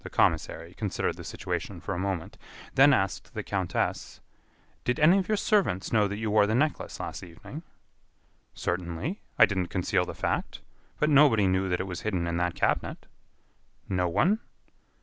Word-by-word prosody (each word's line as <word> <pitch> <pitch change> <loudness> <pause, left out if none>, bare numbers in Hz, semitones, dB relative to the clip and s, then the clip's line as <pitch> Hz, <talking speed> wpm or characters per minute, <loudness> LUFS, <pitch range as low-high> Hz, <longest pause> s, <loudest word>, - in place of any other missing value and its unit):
The - - -7
commissary 85 +1 0
considered 105 -1 -2
the - - -8
situation - - -4
for - - -4
a 90 - -3
moment, 95 -3 -3 0.4
then 140 +2 +7
asked 95 -8 0
the - - -3
countess: 95 -3 -2 0.6
"Did 125 +5 0
any 170 +6 +6
of 185 - -2
your 215 - +1
servants 195 - +1
know 105 -2 +4
that 100 +1 -4
you 110 -1 -2
wore 105 -1 +5
the 110 - +1
necklace 150 +4 -1
last - - -5
evening?" 90 - -10 0.9
"Certainly; 90 - -3 0.2
I 115 - +9
didn't 95 -4 -1
conceal 90 0 0
the - - -7
fact. - - -2 0.4
But 150 +1 +2
nobody 135 -8 +6
knew 95 0 +1
that 90 - 0
it 95 - -2
was 90 -2 -5
hidden 95 -5 -1
in 85 0 -1
that 90 0 0
cabinet." - - -1 0.8
"No 90 -2 0
one?" 195 - +2
100 Hz, 170 wpm, -28 LUFS, 90-140 Hz, 0.9 s, I